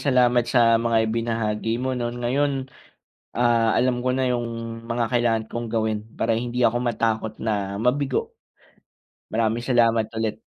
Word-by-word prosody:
salamat 125 -3 +3
sa 115 -2 +4
mga 115 -1 +2
ibinahagi 115 -1 -1
mo 130 +2 -2
'no. 120 -2 -2
Ngayon, 130 +3 -1 0.7
ah, 115 -2 +2
alam 125 -1 +1
ko 130 - +2
na 130 0 0
yung 120 -1 0 0.4
mga 115 0 -1
kailangan 120 -2 +1
kong 120 0 -4
gawin 110 -2 -1
para 115 0 0
hindi 120 +1 -3
ako 120 -1 +3
matakot 110 -2 0
na 100 -2 -2
mabigo. 130 +2 0 0.9
Maraming 115 +1 0
salamat 115 -3 +2
ulit. 110 -1 -2
120 Hz, 140 wpm, -23 LUFS, 115-125 Hz, 0.9 s, sa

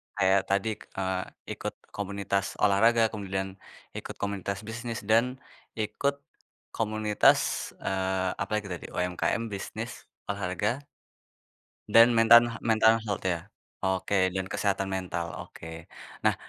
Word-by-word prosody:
Kayak 95 0 +4
tadi, 100 +3 +2
eee, 95 -1 -3 0.3
ikut - - -4 0.2
komunitas 100 -1 -1 0.2
olahraga, 115 +4 +5
kemudian 95 -2 -3 0.5
ikut - - -6
komunitas 100 0 -3
bisnis, 115 0 -4
dan 115 +5 +3 0.4
ikut 140 +6 0 0.6
komunitas, 110 -1 +3 0.4
eee, 95 -1 0
apalagi 105 +1 -1
tadi, 90 - -5
UMKM, 90 +5 -1
bisnis, 110 +4 -6 0.2
olahraga 100 +4 -1 1.1
dan 115 +1 +9
mentan 115 +1 +8 0.2
mental 110 0 +5
health 100 -3 -3
ya? 85 +1 -2 0.3
Oke 95 0 +1
dan 95 0 -2
kesehatan 100 0 0
mental, 90 -3 -3
oke. 80 - -11 0.6
Nah, - - +4
100 Hz, 110 wpm, -28 LUFS, 95-110 Hz, 1.1 s, dan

